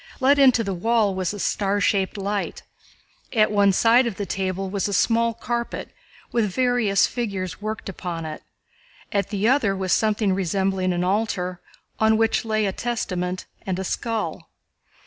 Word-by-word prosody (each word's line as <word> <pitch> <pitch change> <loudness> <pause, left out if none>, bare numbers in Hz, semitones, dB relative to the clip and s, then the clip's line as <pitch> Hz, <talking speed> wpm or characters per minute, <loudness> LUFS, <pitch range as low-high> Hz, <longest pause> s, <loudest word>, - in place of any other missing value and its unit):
Let 280 +2 +4
into 255 -4 +5
the 195 -2 -2
wall 215 +2 +2
was 185 -1 -1
a 205 - -6
star 200 0 0
shaped 195 -1 +1
light. 200 0 -3 0.7
At 215 -3 +3
one 200 -1 +4
side 235 +5 +4
of 225 - -3
the 205 - -4
table 190 0 -2
was 195 +1 -1
a 200 - -3
small 230 +3 +2
carpet 235 +1 -4 0.4
with 225 -3 +1
various 245 -3 +2
figures 200 -7 -4
worked 215 +1 -4
upon 175 -3 -5
it, 155 -1 -6 0.7
at 200 -1 0
the 205 0 0
other 240 -7 +3
was 190 -2 0
something 215 -2 +2
resembling 190 0 0
an 175 0 0
altar 185 -2 -1 0.4
on 220 0 +4
which 225 +1 +2
lay 215 -1 +1
a 195 - 0
Testament 185 -5 -3 0.2
and 190 -2 -2
a 190 - -3
skull. 225 +3 -3
205 Hz, 165 wpm, -23 LUFS, 190-225 Hz, 0.7 s, into